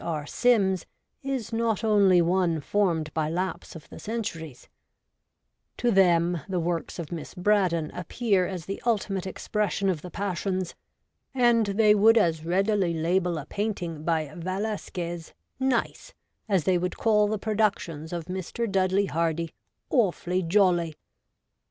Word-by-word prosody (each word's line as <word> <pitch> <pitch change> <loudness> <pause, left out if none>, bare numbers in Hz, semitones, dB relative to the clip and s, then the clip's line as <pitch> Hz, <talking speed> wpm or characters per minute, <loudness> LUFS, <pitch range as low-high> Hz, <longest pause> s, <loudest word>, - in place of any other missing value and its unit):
R. 155 -3 -3
Sims 195 -3 +2 0.3
is 265 -5 -3
not 225 -2 0
only 200 -5 +5
one 175 -2 +1
formed 165 -2 0
by 155 -1 0
lapse 180 +1 -3
of 160 - -11
the - - -10
centuries: 170 - -5 1.1
to 240 - +1
them 175 -4 +3
the 185 -2 0
works 170 0 -2
of 165 -4 -6
Miss 165 0 -6
Braddon 180 -5 +1
appear 190 +1 0
as 180 -4 -6
the 195 - -5
ultimate 200 -5 -1
expression 200 0 -1
of 170 -5 -1
the 180 - -8
passions, 185 -1 -2 0.6
and 240 -4 +4
they 210 +1 +4
would 220 +3 +5
as 165 -7 +2
readily 190 0 +1
label 175 +1 +1
a 145 - -5
painting 175 -5 -3
by 155 -3 -1
Velasquez 180 -2 -4
' - - -53
nice 260 -3 -1 0.2
' - - -52
as 190 -5 +2
they 180 +1 +2
would 180 +1 -3
call 210 -2 +3
the 215 +1 -1
productions 200 -7 -1
of 170 -2 -4
Mr. 190 +6 -3
Dudley 195 0 +2
Hardy 165 -1 -1 0.2
' - - -51
awfully 185 -6 +1
jolly.' 175 -3 +2
185 Hz, 145 wpm, -26 LUFS, 170-210 Hz, 1.1 s, only